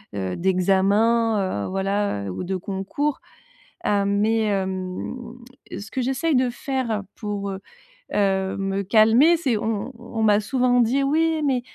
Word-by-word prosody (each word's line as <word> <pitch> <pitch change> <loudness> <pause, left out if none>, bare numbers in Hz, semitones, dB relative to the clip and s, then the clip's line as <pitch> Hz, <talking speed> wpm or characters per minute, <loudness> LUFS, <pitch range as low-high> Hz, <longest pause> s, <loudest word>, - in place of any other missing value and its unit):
heu, 95 -2 -3
d'examens, 195 - +2
heu, - - -4
voilà, 195 - -1
heu, - - -4
ou 95 - -5
de 190 +1 -2
concours. 200 +11 -3 0.6
Hem, 200 0 +1
mais, 220 +2 +2
hem, 190 +1 -3 0.6
ce 200 0 -7
que 260 - -2
j'essaye 270 +5 0
de 255 -1 +3
faire, 245 -4 -2
pour, 205 -2 -4
heu 190 - -5 0.6
heu 190 -1 +1
me 195 0 -1
calmer 225 - +5
c'est 260 -9 0
on 220 +3 -2
on 230 -1 -4
m'a 210 -1 +4
souvent 245 +3 +1
dit 245 +4 +2
«Oui 320 +3 +1
mais, 260 -3 +1
210 Hz, 150 wpm, -23 LUFS, 195-245 Hz, 0.6 s, calmer